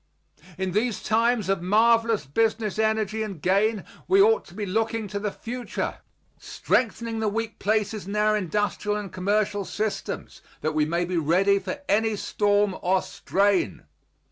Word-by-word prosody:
In 190 0 -2
these 215 +3 -1
times 230 -1 +2
of 195 -2 0
marvelous 225 +1 +3
business 220 +7 0
energy 220 -1 0
and 200 -6 -4
gain 200 +4 +1 0.2
we 385 +1 +4
ought 445 +3 +5
to 175 - -15
be 210 0 -3
looking 225 +2 -1
to 200 - -3
the 210 0 -1
future, 245 +4 -5 0.4
strengthening 230 -1 -1
the 220 - 0
weak 225 +1 -4
places 210 -1 -1
in 200 - -4
our 215 0 +3
industrial 205 +1 -1
and 205 -3 -6
commercial 205 +2 0
systems, 215 +2 -4 0.2
that 155 +1 -1
we 155 -1 +2
may 170 +3 0
be 180 0 -2
ready 185 +6 +3
for 195 +9 -5
any 220 +2 +2
storm 205 -1 +1
or 185 +1 +2
strain. 195 - 0
210 Hz, 155 wpm, -25 LUFS, 190-220 Hz, 0.4 s, ought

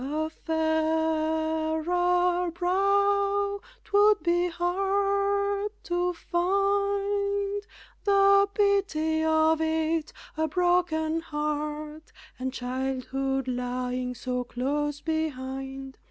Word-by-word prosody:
A 310 +3 -2
fairer 315 0 0 0.7
brow 400 +2 +2 0.2
'twould 415 +1 +4
be 350 +1 +2
hard 400 +3 0
to 355 +1 0
find 400 +3 0 0.4
The 395 0 +5
pity 385 -7 +1
of 315 0 +3
it! 320 0 0 0.2
a 315 0 0
broken 335 -2 +1
heart, 300 0 -4 0.3
And 260 +1 -2
childhood 265 +1 -2
lying 250 0 -2
so 250 +1 -3
close 290 +4 -2
behind. 270 -4 -4
320 Hz, 80 wpm, -27 LUFS, 295-395 Hz, 0.7 s, The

